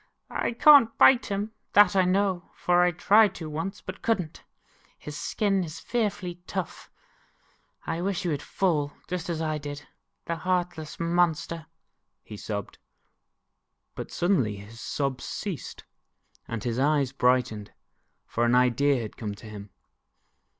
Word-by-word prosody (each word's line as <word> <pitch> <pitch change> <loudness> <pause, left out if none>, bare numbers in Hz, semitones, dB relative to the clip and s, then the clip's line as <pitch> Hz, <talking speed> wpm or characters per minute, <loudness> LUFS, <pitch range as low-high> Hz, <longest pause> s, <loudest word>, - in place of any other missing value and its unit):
I - - -1
can't 255 -2 +7
bite 260 -1 +6
him, 205 0 -2 0.2
that 205 -2 +6
I 190 -1 +4
know, 185 -1 0
for 175 0 +2
I 180 - +5
tried 205 +5 +4
to 160 - -6
once 165 +5 -5
and 185 - -7
could 225 -3 +2
n't. 160 -4 -7 0.5
His 150 - -8
skin 195 +3 0
is 155 -2 -7
fearfuly 205 -7 -2
tough. 190 -4 -5 1.0
I 165 +1 -2
wish 195 0 -1
he 175 - -1
would 145 -3 -1
fall, 150 -7 0
just 180 -1 -4
as 165 -1 -2
I 155 -1 -1
did, 145 0 -7 0.4
the 170 - -2
heartless 175 -3 -2
monster," 170 -1 0 0.6
he 105 - -9
sobbed. 100 -1 -6 1.1
But - - -7
suddenly 160 - +1
his 100 +3 -11
sobs 135 -2 -2
ceased, 195 -8 -6 0.6
and 115 -2 -4
his 120 0 -2
eyes 140 -2 +2
brightened, 125 -5 +1 0.5
for 120 - -1
an 120 +1 +3
idea 125 +1 +3
had 110 - -8
come 105 -3 -4
to 105 - -14
him. 105 -1 -9
165 Hz, 145 wpm, -27 LUFS, 130-185 Hz, 1.1 s, can't